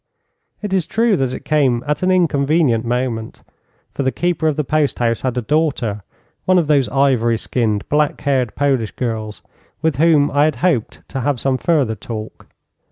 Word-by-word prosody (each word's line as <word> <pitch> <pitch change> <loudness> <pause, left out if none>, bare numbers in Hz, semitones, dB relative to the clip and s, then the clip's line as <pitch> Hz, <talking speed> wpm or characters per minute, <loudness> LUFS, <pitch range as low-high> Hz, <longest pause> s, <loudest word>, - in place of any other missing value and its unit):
It 205 -2 -3
is 185 -4 +1
true 225 -2 +2
that 130 -3 0
it - - -7
came 135 -6 +2
at 150 0 -1
an 185 - +1
inconvenient 150 -8 +2
moment, 120 -2 -3 0.5
for - - -4
the 130 -1 +1
keeper 170 +3 -1
of 155 - +1
the 150 - -1
post 150 +1 0
house 115 -2 0
had 130 -1 -2
a 125 - -1
daughter 135 -7 0 0.4
one 185 0 +4
of 170 - +3
those 145 -3 +2
ivory 130 -4 +2
skinned, 110 -3 -1
black 150 0 +1
haired 130 -5 0
Polish 135 -6 +1
girls 110 -4 -4 0.4
with 160 -5 +1
whom 150 -2 +4
I 145 +1 +3
had 155 - 0
hoped 140 -12 -1
to 135 - -4
have 135 0 0
some 135 +1 0
further 140 -7 +1
talk. 110 +1 -8
135 Hz, 180 wpm, -18 LUFS, 120-155 Hz, 0.5 s, one